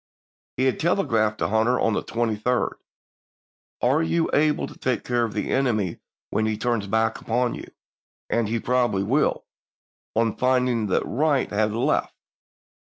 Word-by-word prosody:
He 130 - +1
had 130 - +1
telegraphed 115 - +1
to - - -1
Hunter 110 +4 +2
on 115 - +2
the - - 0
23d, 115 +1 -1 1.1
"Are 135 +6 +3
you 165 0 0
able 150 0 +2
to - - -11
take 125 -5 -1
care 120 -1 0
of 115 - -2
the - - -2
enemy 110 -10 0 0.3
when 110 - +1
he 110 -1 -1
turns 115 -4 -1
back 110 +2 0
upon 120 +1 0
you, - - -8 0.6
as 115 -3 0
he 115 +1 0
probably 120 -5 +1
will, 135 +9 +1 0.7
on 115 -1 +2
^J}^0 - - -23
finding 125 -3 +2
that 95 - +1
Wright 145 +1 +1
has 105 +1 +1
left?" 115 - 0
115 Hz, 155 wpm, -24 LUFS, 110-125 Hz, 1.1 s, Are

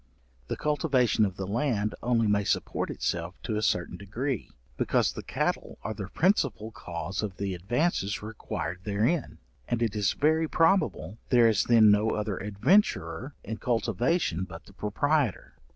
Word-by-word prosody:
The - - -3
cultivation 135 -7 +2
of 95 -3 -3
the 95 - -4
land 110 0 0
only 115 -2 +2
may 105 -1 +2
support - - -1
itself 85 +2 -2
to 110 - -2
a 105 - 0
certain 90 -4 0
degree, 115 +6 -3 0.3
because - - +1
the - - -6
cattle - - -2
are 110 - -3
the 100 -2 -6
principal 140 - +1
cause 90 -1 -5
of 100 -3 -4
the 100 -1 -2
advances 105 - -1
required 90 -5 -5
therein, 110 - 0 0.3
and 120 0 0
it 110 -2 -1
is 105 -3 +1
very 160 +2 +2
probable, 155 - +1
there 120 -2 +6
is 110 -3 +2
then 110 -3 +6
no 105 +2 +2
other 105 -2 -2
adventurer 105 - +1
in 110 - -5
cultivation 120 - 0
but - - -9
the - - -16
proprietor. 140 - 0
110 Hz, 155 wpm, -28 LUFS, 100-130 Hz, 0.3 s, there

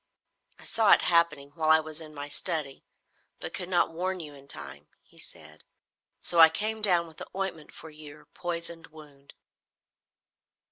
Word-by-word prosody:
"I - - -12
saw 220 -2 +4
it - - +4
happening 170 -5 +2
while 155 0 -1
I 160 0 +7
was 155 0 -5
in 155 -1 -10
my 145 0 -6
study, 150 -3 -3 0.6
but - - -7
could 180 - -4
not 175 -3 +2
warn 185 +2 -2
you 150 -3 -8
in 140 -1 -16
time," 70 - -7 0.2
he - - -22
said. 80 0 -12 0.6
"So 170 - +1
I 160 0 +10
came 215 +6 -2
down 180 -5 +4
with 160 -1 -15
the - - -8
ointment 190 -5 -4
for 160 - -11
your 150 -1 -13
poisoned 170 -1 -5
wound." 145 -3 -16
160 Hz, 170 wpm, -28 LUFS, 145-175 Hz, 0.6 s, I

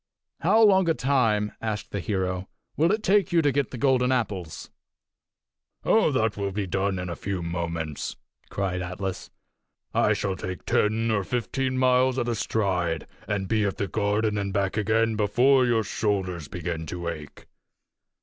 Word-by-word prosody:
"And 165 - -1
how 220 +3 +6
long 190 -4 +5
a 165 - +3
time," 115 -7 +1
asked 110 -2 -3
the 100 - -2
hero, 95 -1 -2 0.3
"will 165 +4 +3
it 215 +1 0
take 200 -4 +3
you 170 -1 +3
to 145 - +3
get 140 -2 0
the 125 - -7
golden 130 -1 +2
apples?" 100 -10 -3 1.1
"Oh, 220 - +4
that 110 -5 +1
will 100 -1 -2
be 100 +1 -2
done 95 +1 -1
in 90 0 -4
a 85 - -4
few 95 -1 -4
moments!" 85 -3 -3 0.3
cried 95 -2 -2
Atlas. 90 +1 -5 0.6
"I - - +3
shall 95 -2 -2
take 90 0 -6
ten 110 +2 +1
or 100 -2 +1
fifteen 130 +4 -2
miles 130 0 +3
at 120 - 0
a 120 - +1
stride, 90 -7 -1 0.2
and 100 -2 -1
be 110 +1 +1
at 100 -2 -1
the 100 - -1
garden 105 +2 0
and 100 -1 -2
back 100 -1 0
again 110 +1 +2
before 125 +5 +4
your 115 -2 +2
shoulders 95 -7 -2
begin 85 0 -4
to 85 +2 -5
ache." 75 -3 -7
105 Hz, 170 wpm, -26 LUFS, 95-125 Hz, 1.1 s, how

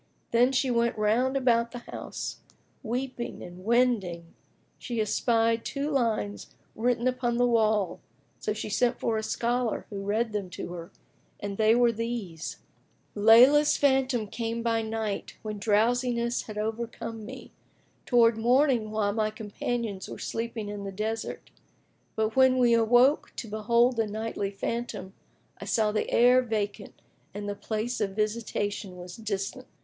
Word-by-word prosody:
Then 245 +2 +4
she 260 -1 +1
went 235 -1 +1
round 240 +6 +2
about 235 -2 +2
the - - -5
house, - - -5 0.4
weeping, 250 +1 -4
and 175 +1 -10
wending 210 -8 +1 0.5
she 240 -2 -4
espied 225 +1 +1
two 285 +2 -3
lines 225 -6 -1 0.2
written 240 +2 0
upon 250 -2 0
the 245 - +4
wall; 220 -5 +2 0.4
so - - -2
she 210 +1 -4
sent 240 +4 +1
for 225 -1 0
a - - -2
scholar, 240 +1 -1
who 200 -1 -4
read 215 +3 0
them 205 -3 -3
to 180 - -6
her; 170 -1 -8 0.5
and 200 -1 -4
they 220 +1 +5
were 240 -1 +4
these, 225 -8 -4 0.6
"Leyla's 245 +8 +6
phantom 265 -4 +2
came 230 +2 -4
by 230 -1 +1
night, 220 -2 -4
when 215 -1 -5
drowsiness 235 +3 +1
had 215 -1 -7
overcome 225 +1 -4
me, 255 +4 -9 0.6
towards 230 -2 +4
morning 245 -1 +3
while 210 -1 0
my 215 0 +1
companions 215 -1 -4
were - - -7
sleeping 230 -2 -4
in 205 -1 -5
the 195 - -5
desert, 220 +3 -4 0.6
But 220 0 0
when 260 -1 +5
we 240 -2 +4
awoke 245 +5 +4
to 230 - -6
behold 235 +3 +2
the 225 -1 +1
nightly 215 -1 -3
phantom, 200 -1 -4 0.5
I - - -7
saw 215 -2 +2
the 215 - -1
air 250 +2 +5
vacant 215 -4 -4 0.4
and 205 0 -5
the 205 - -2
place 220 +4 -3
of 195 -2 -1
visitation 210 -3 -2
was 180 0 -9
distant." 210 -4 -4
225 Hz, 150 wpm, -28 LUFS, 210-240 Hz, 0.6 s, Leyla's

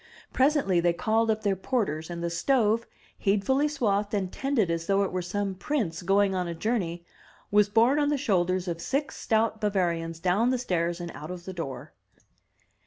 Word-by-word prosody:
Pres 280 +4 +3
ently 190 - +2
they 175 0 +2
called 220 +6 +1
up 215 0 0
their 200 -2 +2
porters, 185 - -2
and 170 -1 -5
the 170 - -1
stove, 225 +4 +1 0.3
heedfully 220 +9 +2
swathed 210 -8 0
and 190 -3 -2
tended 260 -10 0
as 165 0 -3
though 195 0 +3
it 195 - -2
were 185 - -2
some 195 +2 -2
prince 190 - -2
going 195 +2 +2
on 180 -1 -1
a 170 - -4
journey, 175 -3 -2 0.5
was 205 0 +4
borne 235 +7 +4
on 290 -1 +2
the 295 - +1
shoulders 185 -7 0
of 170 -1 -3
six 275 - -2
stout 220 0 0
Bavarians 170 -5 -1
down 185 +7 +2
the 255 - +1
stairs 175 -7 -1
and 175 -1 -5
out 155 - -9
of 180 -1 -7
the 190 - -6
door. 140 -5 -6
195 Hz, 190 wpm, -27 LUFS, 175-225 Hz, 0.5 s, was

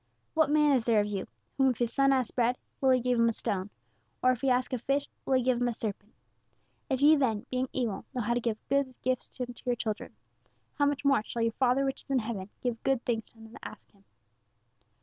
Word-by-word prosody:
'What 315 -2 +3
man 300 0 +4
is 240 -3 0
there 225 -3 +4
of 205 - +2
you, 205 -2 -3 0.3
whom 270 -1 +4
if 250 - -1
his 240 -1 -1
son 275 0 +4
ask 260 -3 +1
bread, 245 0 +2 0.2
will 265 - +4
he 255 -1 +5
give 250 0 +1
him 230 0 +5
a - - -1
stone? 195 -2 -2 0.5
Or 255 - +6
if 250 - -3
he 270 - +2
ask 250 +1 +1
a 255 - 0
fish, 275 +4 0 0.2
will 265 - +2
he 255 - +2
give 245 -1 +1
him 245 - +2
a 240 - 0
serpent? 215 -1 -5 0.8
If 265 0 0
ye 305 +2 +8
then, 230 -7 0
being 255 0 -1
evil, 230 -7 -2
know 245 - 0
how 235 +3 +1
to 240 - +1
give 225 -2 -1
good 275 -2 0
gifts 255 -1 -1
unto 245 -1 -3
your 245 -1 +1
children, 220 -2 -4 0.6
how 285 -2 +2
much 285 0 -2
more 275 -4 +4
shall 230 +1 -3
your 230 - +2
Father 260 +3 +2
which 270 - -2
is - - -41
in 270 - +2
heaven 215 -5 -3
give 240 -2 -2
good 270 -3 0
things 225 -2 -1
to - - -24
them 225 0 -14
that - - -12
ask - - -14
Him.'" 200 -2 -27
250 Hz, 250 wpm, -29 LUFS, 230-265 Hz, 0.8 s, ye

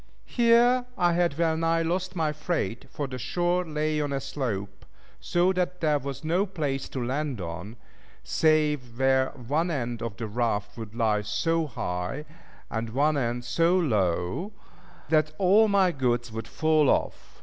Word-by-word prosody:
Here 240 +1 +4
I 175 -1 +3
had 170 -4 +1
well 165 -1 +2
nigh 165 +1 +1
lost 180 +3 -2
my 155 -3 0
freight, 155 - -3
for 145 - -4
the 130 -1 -6
shore 175 +7 0
lay 155 -1 -1
on 145 -1 -2
a 140 - 0
slope, 110 -8 -4 0.4
so 175 +2 +2
that 180 0 -1
there 150 -2 +2
was 140 +1 -6
no 175 +6 +1
place 145 -7 -3
to 125 -3 -3
land 135 -1 -2
on, 90 +5 -6 0.5
save 150 -6 +1
where 130 0 +3
one 145 +8 -2
end 120 -7 -3
of 115 -4 -5
the 115 - -4
raft 105 -2 -1
would 110 -2 -8
lie 110 -3 +2
so 160 +10 0
high, 90 +3 -4 0.5
and 115 0 -2
one 145 +6 +2
end 120 -2 -1
so 165 +9 +2
low, 105 - 0 0.6
that 155 -1 +2
all 200 +4 +5
my 195 -3 +3
goods 120 -5 -1
would 115 +1 -5
fall 155 -2 +2
off. - - -1
145 Hz, 160 wpm, -27 LUFS, 120-170 Hz, 0.6 s, all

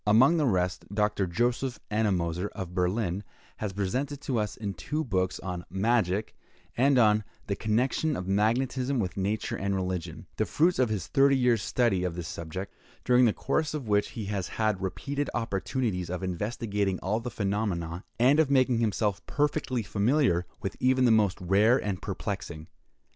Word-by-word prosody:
Among 130 +11 +6
the 150 -3 +2
rest, 90 -3 0
Dr. 105 -2 +1
Joseph 120 +6 -1
Ennemoser, 95 -4 0
of 90 -2 -6
Berlin, 95 +1 0 0.3
has 105 -2 -3
presented 125 +9 -2
to 130 -5 -1
us 105 -1 -3
in 105 -2 -4
his 95 - -6
two 150 - -2
books 95 -6 -1
on 90 -2 -4
"Magic," 100 +1 +1 0.4
and 135 +2 +4
on 110 -2 +4 0.2
"The 100 - -1
Connection 125 +9 0
of 90 - -5
Magnetism 125 +6 +1
with 95 -6 -1
Nature 100 +3 -1
and 100 0 -1
Religion," 90 -3 -3
the - - 0
fruits 170 +2 +2
of 125 -3 +3
his 100 -5 -2
thirty 140 0 +4
years' 125 -4 +3
study 110 -7 +1
of 90 -2 -2
this 85 -2 -5
subject—during 95 +9 -1
the 115 - +4
course 155 +7 -1
of 140 -6 -5
which 105 -1 +2
he 110 - -3
has 100 -3 -2
had 110 -4 -1
repeated 140 +10 -3
opportunities 110 -3 -2
of 90 +1 -4
investigating 100 +1 -1
all 105 +4 0
the 120 +1 -5
phenomena, 95 -5 -2
and 130 +6 +4
of 155 -3 +4
making 130 -3 +3
himself 105 -3 0
perfectly 145 -5 0
familiar 100 - +1 0.2
with 95 - -3
even 130 0 +3
the 120 - +5
most 105 -4 +3
rare 100 +7 +4
and 100 -7 -3
perplexing. 95 -5 -5
105 Hz, 170 wpm, -28 LUFS, 95-125 Hz, 0.4 s, Among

